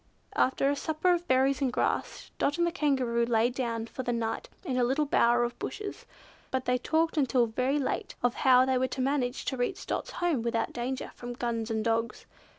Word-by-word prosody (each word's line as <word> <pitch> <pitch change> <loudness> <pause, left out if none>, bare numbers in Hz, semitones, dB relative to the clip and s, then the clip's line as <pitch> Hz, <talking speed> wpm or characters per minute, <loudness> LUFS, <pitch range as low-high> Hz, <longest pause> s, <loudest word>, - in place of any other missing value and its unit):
After 265 +1 +2
a 285 - +2
supper 315 +4 +1
of 350 0 -2
berries 265 +1 +3
and 265 -2 +1
grass, - - -2
Dot 290 - +1
and 345 - +3
the 340 - 0
Kangaroo 260 -8 +1
lay 235 0 +2
down 235 -3 -2
for 245 - -6
the 245 -1 -2
night 230 -1 -2 0.2
in 260 - -1
a 250 - +2
little 270 +5 +2
bower 240 -3 +3
of 240 0 -3
bushes. 415 -1 -6 0.4
But 260 -1 -2
they 250 0 +1
talked 320 +4 +1
until 255 -4 +3
very 255 +5 0
late, 280 - -2
of 245 -1 +3
how 255 -1 +5
they 260 -1 +1
were 260 - +1
to 255 +1 -4
manage 260 -1 0
to 265 - -2
reach 245 +10 -2
Dot's - - -3
home 340 -8 0
without 230 0 -1
danger 250 +2 -3
from 245 0 -7
guns 235 -2 -2
and 220 0 -1
dogs. 230 0 -1
255 Hz, 210 wpm, -29 LUFS, 240-280 Hz, 0.4 s, how